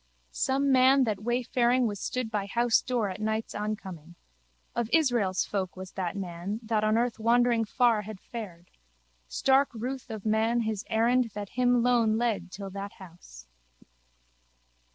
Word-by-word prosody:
Some 275 - +1
man 265 +1 +5
that 215 -4 -1
wayfaring 245 +1 +1
was 205 -3 -2
stood 250 0 -3
by 205 -2 -2
housedoor 235 -1 +1
at 185 - -8
night's 220 +1 -2
oncoming. 190 -6 -5 0.6
Of 235 -2 -2
Israel's 240 - +2
folk 190 -3 -3
was 185 0 -8
that 185 -1 -3
man 190 +2 -4
that 220 -1 0
on 215 +1 +3
earth 235 -1 0
wandering 235 0 +3
far 230 0 +2
had 210 -1 -9
fared. 185 -8 -9 0.6
Stark 270 - +3
ruth 255 +3 -5
of 220 -2 -7
man 220 +2 +2
his 220 -3 -2
errand 240 +3 +3
that 205 -1 -5
him 245 -1 +2
lone 235 -3 +3
led 215 -6 -1
till 195 0 -7
that 200 +1 -6
house. 170 - -14
220 Hz, 150 wpm, -28 LUFS, 200-245 Hz, 0.6 s, man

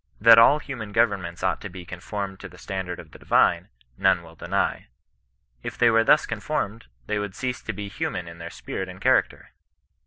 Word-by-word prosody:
That 115 +1 +9
all 125 +6 +7
human 125 -8 -7
governments 100 -7 0
ought 95 -2 0
to 100 - -6
be 90 -1 -10
conformed 95 +2 -6
to 95 - -9
the 90 - -16
stand 95 -1 -5
ard 90 - -5
of - - -12
the - - -14
divine, - - +2 0.3
none 95 -3 +3
will 80 -1 -14
deny. - - -2 0.7
If - - -6
they 120 -1 +5
were 115 0 +4
thus - - +5
conformed, 110 +3 -3 0.2
they 105 -1 -1
would 105 -2 -5
cease 130 -1 -3
to - - -4
be 105 -1 -6
human 135 - -4
in 85 0 -11
their 85 0 -6
spirit 95 +2 -6
and 90 0 -10
character. - - +1
100 Hz, 205 wpm, -25 LUFS, 90-115 Hz, 0.7 s, That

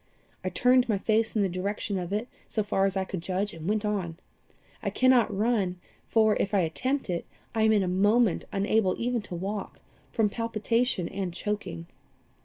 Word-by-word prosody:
I - - -1
turned 250 0 +3
my 210 - +2
face 220 +3 +1
in 210 - +3
the - - +2
direction 195 +2 -2
of 175 0 -5
it, 215 +4 -1 0.2
so 215 - -1
far 195 -1 +2
as 195 0 -2
I 190 - 0
could 185 -2 -5
judge, 190 +3 -1
and 165 +2 -5
went 215 0 0
on. 185 -6 -2 0.6
I - - -1
cannot 255 -3 +4
run, 200 -3 0 0.3
for, 220 -2 +4
if 200 +1 0
I 195 - +4
attempt 255 - -1
it, 175 -3 -2 0.3
I 225 - 0
am 220 0 +5
in 210 -3 +4
a - - -1
moment 205 +3 +3
unable 200 -1 +2
even 240 0 0
to 195 -3 -7
walk 195 +3 -4 0.3
from 220 -2 +2
palpitation 230 -2 0
and 190 -1 -3
choking. 180 - -4
205 Hz, 190 wpm, -28 LUFS, 185-225 Hz, 0.6 s, am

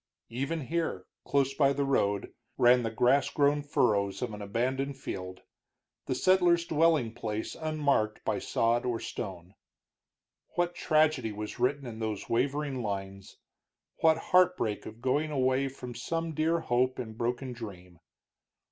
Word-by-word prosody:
Even 140 +7 -2
here, 155 - -2 0.2
close 135 -1 +1
by 140 -1 +3
the 140 0 0
road, 100 -7 0 0.2
ran 125 +1 +6
the 115 - -1
grass 125 +5 +3
grown 145 0 +2
furrows 105 -8 +1
of 120 -3 -3
an 105 - -7
abandoned 130 +6 -1
field, 95 -7 -6 0.6
the 130 - 0
settler's 175 +2 +4
dwelling 155 -8 +2
place 110 -1 -4
unmarked 145 -9 0
by - - 0
sod 115 +1 +1
or 120 -2 -1
stone. 90 -2 -6 1.0
What 175 0 +1
tragedy 155 -8 +2
was 105 +3 -6
written 135 +3 +1
in 115 -2 -7
those 110 -2 -3
wavering 135 +2 0
lines; 100 -2 -5 0.6
what 160 -1 +4 0.2
heartbreak 180 - +3
of 110 +2 -11
going 145 +4 +1
away 130 -1 +1
from 125 -2 -8
some 165 +7 -3
dear 160 +2 +1
hope 125 0 +1
and 110 -3 -6
broken 125 +3 -2
dream! 90 -7 -10
125 Hz, 140 wpm, -29 LUFS, 110-145 Hz, 1.0 s, ran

